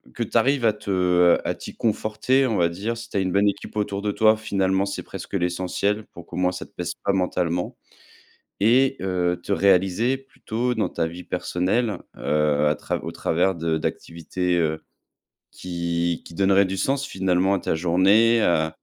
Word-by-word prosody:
Que 120 Hz, -, -1 dB
tu 115 Hz, -, -9 dB
arrives 125 Hz, +2 st, +3 dB
à 110 Hz, -, +4 dB
te 90 Hz, -4 st, +3 dB
à -, -, 0 dB
t'y -, -, -10 dB
conforter, 115 Hz, +4 st, +1 dB
on 110 Hz, -4 st, 0 dB
va 85 Hz, -1 st, +3 dB
dire, 105 Hz, +7 st, -4 dB
si 115 Hz, -, -8 dB
tu -, -, -4 dB
as -, -, +3 dB
une 95 Hz, -1 st, 0 dB
bonne 100 Hz, +2 st, +3 dB
équipe 100 Hz, -, -3 dB
autour 100 Hz, -1 st, -2 dB
de 105 Hz, 0 st, -1 dB
toi, 110 Hz, +1 st, +4 dB
finalement, 100 Hz, -2 st, 0 dB
c'est 100 Hz, -, -4 dB
presque -, -, -8 dB
l'essentiel, 95 Hz, +4 st, -1 dB
pour 85 Hz, -, -13 dB
qu'au 85 Hz, -, -9 dB
moins, 90 Hz, 0 st, +2 dB
ça 90 Hz, -, -7 dB
te -, -, -22 dB
pèse 85 Hz, -1 st, -4 dB
pas 100 Hz, -, +2 dB
mentalement. 90 Hz, -2 st, -1 dB, 0.8 s
Et 130 Hz, +6 st, +4 dB
heu, 90 Hz, -2 st, 0 dB
te 100 Hz, -, -6 dB
réaliser 100 Hz, +6 st, +3 dB
plutôt 125 Hz, -3 st, -3 dB
dans 110 Hz, -, 0 dB
ta 80 Hz, -, -2 dB
vie 85 Hz, +2 st, -9 dB
personnelle, 100 Hz, +4 st, -1 dB, 0.2 s
heu, 75 Hz, -1 st, +1 dB
à 75 Hz, -, +2 dB
trav -, -, -4 dB
au -, -, -4 dB
travers 90 Hz, +3 st, 0 dB
de 80 Hz, -1 st, -1 dB
d'activités 85 Hz, +3 st, -2 dB
heu, 80 Hz, -1 st, -1 dB, 0.7 s
qui 85 Hz, -1 st, -2 dB
qui 85 Hz, -, -12 dB
donneraient 100 Hz, +1 st, +4 dB
du 95 Hz, +1 st, -3 dB
sens 135 Hz, +7 st, 0 dB
finalement 95 Hz, -1 st, +1 dB
à -, -, -1 dB
ta -, -, -1 dB
journée, 95 Hz, +8 st, +4 dB
heu 80 Hz, -2 st, +2 dB
95 Hz, 190 wpm, -23 LUFS, 90-110 Hz, 0.8 s, à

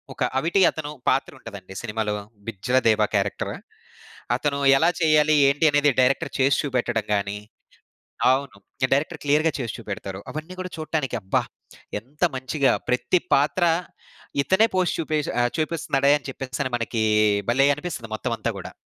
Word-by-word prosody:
ఒక -, -, -16 dB, 0.2 s
అవిటి 175 Hz, +6 st, +1 dB
అతను 150 Hz, -2 st, -5 dB, 0.2 s
పాత్ర 135 Hz, -, 0 dB
ఉంటదండి 95 Hz, -2 st, -10 dB
సినిమాలో 105 Hz, -2 st, -2 dB, 0.3 s
బిజ్జలదేవ 115 Hz, +1 st, +2 dB
క్యారెక్టర్. 100 Hz, 0 st, -1 dB, 0.8 s
అతను 140 Hz, +2 st, -1 dB, 0.2 s
ఎలా 165 Hz, +4 st, +4 dB
చేయాలి? 155 Hz, -1 st, +4 dB, 0.2 s
ఏంటి? 145 Hz, +3 st, +1 dB
అనేది 145 Hz, 0 st, +4 dB
డైరెక్టర్ 135 Hz, +4 st, +2 dB
చేసి 135 Hz, +1 st, +3 dB
చూపెట్టడం 120 Hz, -5 st, -1 dB
గాని 100 Hz, 0 st, -2 dB, 1.0 s
అవును. 135 Hz, -3 st, 0 dB, 0.4 s
డైరెక్టర్ 155 Hz, +4 st, 0 dB
క్లియర్‌గా 150 Hz, +2 st, +2 dB
చేసి 115 Hz, -4 st, -4 dB
చూపెడతారు. 100 Hz, -1 st, -6 dB
అవన్నీ 155 Hz, +4 st, -7 dB
గూడా 185 Hz, -, -5 dB
చూడటానికి 155 Hz, -5 st, -2 dB
అబ్బా! 95 Hz, -1 st, 0 dB, 0.6 s
ఎంత 140 Hz, -, -23 dB
మంచిగా! 135 Hz, +1 st, +1 dB, 0.2 s
ప్రతి 125 Hz, +8 st, +2 dB
పాత్ర 150 Hz, +6 st, +2 dB, 0.8 s
ఇతనే 190 Hz, -, +3 dB
పోస్ట్ 185 Hz, -2 st, +1 dB
చూపె 155 Hz, -1 st, -1 dB, 0.2 s
ఆహ్, 120 Hz, -, +1 dB
చూపిస్తున్నాడే 145 Hz, -3 st, +1 dB
అని 140 Hz, -, -12 dB
చెప్పేసని 130 Hz, 0 st, -4 dB
మనకి 115 Hz, -1 st, -1 dB, 0.5 s
భలే 135 Hz, +3 st, +4 dB
అనిపిస్తుంది 150 Hz, -8 st, -6 dB
మొత్తం -, -, -2 dB
అంతా -, -, -2 dB
గూడా. -, -, -8 dB
135 Hz, 135 wpm, -24 LUFS, 115-155 Hz, 1.0 s, ఎలా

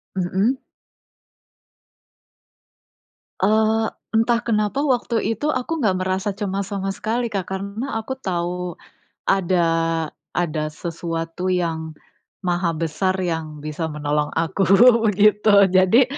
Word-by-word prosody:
Mhm. 190 Hz, +8 st, +1 dB, 2.8 s
Eee, 220 Hz, +2 st, +3 dB, 0.3 s
entah 235 Hz, +1 st, +2 dB
kenapa 215 Hz, +3 st, 0 dB
waktu 245 Hz, -4 st, +1 dB
itu 260 Hz, +8 st, -1 dB
aku 255 Hz, +6 st, -2 dB
nggak 210 Hz, -9 st, +1 dB
merasa 190 Hz, +2 st, -1 dB
cemas 200 Hz, 0 st, -3 dB
sama 195 Hz, 0 st, -2 dB
sekali 230 Hz, +4 st, -2 dB
Kak, 195 Hz, -3 st, -2 dB
karena 200 Hz, +7 st, -4 dB
aku 265 Hz, +4 st, -5 dB
tahu 180 Hz, -4 st, -3 dB, 0.5 s
ada 185 Hz, -2 st, +2 dB, 0.7 s
ada 155 Hz, -3 st, -1 dB
sesuatu 165 Hz, +2 st, -4 dB
yang 160 Hz, -3 st, -1 dB, 0.5 s
maha 175 Hz, -1 st, +1 dB
besar 175 Hz, +4 st, 0 dB
yang 160 Hz, -3 st, -3 dB
bisa 155 Hz, +2 st, -3 dB
menolong 150 Hz, 0 st, -1 dB
aku 165 Hz, +4 st, 0 dB, 0.5 s
begitu. 210 Hz, +1 st, +3 dB, 0.2 s
Jadi, 190 Hz, +7 st, +5 dB
190 Hz, 105 wpm, -22 LUFS, 170-220 Hz, 2.8 s, Jadi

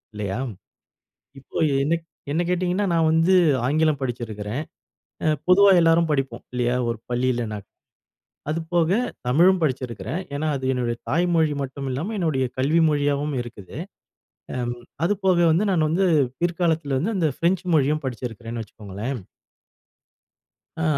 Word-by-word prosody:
இல்லையா? 100 Hz, +1 st, -3 dB, 1.0 s
இப்போ -, -, -9 dB, 0.3 s
என்ன 160 Hz, +3 st, +2 dB
க் -, -, -43 dB, 0.2 s
என்ன 170 Hz, +4 st, +1 dB
கேட்டீங்கன்னா, 180 Hz, +2 st, 0 dB
நான் 160 Hz, -1 st, +3 dB
வந்து 165 Hz, +3 st, +3 dB, 0.3 s
ஆங்கிலம் 155 Hz, 0 st, +2 dB
படிச்சிருக்கிறேன். 115 Hz, 0 st, -4 dB, 0.6 s
அ -, -, +4 dB, 0.2 s
பொதுவா 195 Hz, +2 st, +7 dB
எல்லாரும் 165 Hz, 0 st, +4 dB
படிப்போம். 135 Hz, -2 st, -2 dB
இல்லையா? 125 Hz, 0 st, +1 dB
ஒரு 115 Hz, -, -4 dB
பள்ளியில. 125 Hz, -1 st, 0 dB, 1.0 s
அதுபோக 165 Hz, +1 st, 0 dB, 0.3 s
தமிழும் 175 Hz, +9 st, +4 dB
படிச்சிருக்கிறேன். 130 Hz, -, -2 dB
ஏன்னா 155 Hz, +2 st, -2 dB
அது 130 Hz, -, -6 dB
என்னுடைய 120 Hz, -2 st, -1 dB
தாய் 170 Hz, +5 st, +2 dB
மொழி 160 Hz, -2 st, +3 dB
மட்டும் 135 Hz, +1 st, -5 dB
இல்லாம 160 Hz, -, -3 dB
என்னுடைய 155 Hz, -7 st, +1 dB
கல்வி 150 Hz, +6 st, +3 dB
மொழியாவும் 145 Hz, 0 st, 0 dB
இருக்குது. 115 Hz, -3 st, -11 dB, 0.8 s
அம் 120 Hz, -1 st, -2 dB, 0.3 s
அதுபோக 190 Hz, -1 st, +2 dB
வந்து 185 Hz, +7 st, +2 dB
நான் 160 Hz, -4 st, +2 dB
வந்து 185 Hz, +4 st, +2 dB, 0.3 s
பிற்காலத்துல 165 Hz, -5 st, 0 dB
வந்து 210 Hz, +7 st, -1 dB
அந்த 165 Hz, -4 st, +2 dB
ஃப்ரெஞ்ச் 175 Hz, +2 st, +1 dB
மொழியும் 150 Hz, +1 st, +2 dB
படிச்சிருக்கிறேன்னு 115 Hz, -2 st, -5 dB
வச்சுக்கோங்களேன். 105 Hz, +5 st, -6 dB, 1.6 s
அ -, -, +1 dB
150 Hz, 125 wpm, -23 LUFS, 125-170 Hz, 1.6 s, பொதுவா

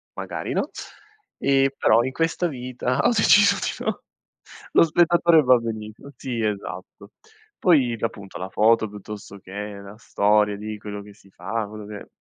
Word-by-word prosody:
magari -, -, -5 dB
no. -, -, -1 dB, 0.7 s
E 135 Hz, 0 st, +2 dB
però 115 Hz, +2 st, +4 dB
in 130 Hz, -, -2 dB
questa 165 Hz, +4 st, 0 dB
vita 125 Hz, -3 st, -3 dB
ho -, -, +3 dB
deciso 205 Hz, -2 st, +5 dB
di -, -, -4 dB
no. -, -, -2 dB, 0.7 s
Lo -, -, +7 dB
spettatore 170 Hz, 0 st, +4 dB
va 130 Hz, -3 st, +5 dB
benissimo. 110 Hz, +3 st, -7 dB
Sì, 120 Hz, -3 st, -4 dB
esatto. 100 Hz, -3 st, -5 dB, 0.5 s
Poi 135 Hz, -10 st, +3 dB
d -, -, -12 dB
appunto 100 Hz, -4 st, -5 dB
la 95 Hz, +1 st, -6 dB
foto 110 Hz, +2 st, +3 dB
piuttosto 105 Hz, -1 st, -10 dB
che 95 Hz, -, -15 dB, 0.3 s
la 100 Hz, +1 st, -11 dB
storia 105 Hz, -2 st, +1 dB
di 110 Hz, +1 st, -6 dB
quello 105 Hz, -1 st, -7 dB
che 105 Hz, 0 st, -14 dB
si 100 Hz, -1 st, -22 dB
fa, 115 Hz, -2 st, -4 dB
quello 105 Hz, 0 st, -9 dB
che 105 Hz, -1 st, -9 dB
110 Hz, 160 wpm, -23 LUFS, 105-135 Hz, 0.7 s, Lo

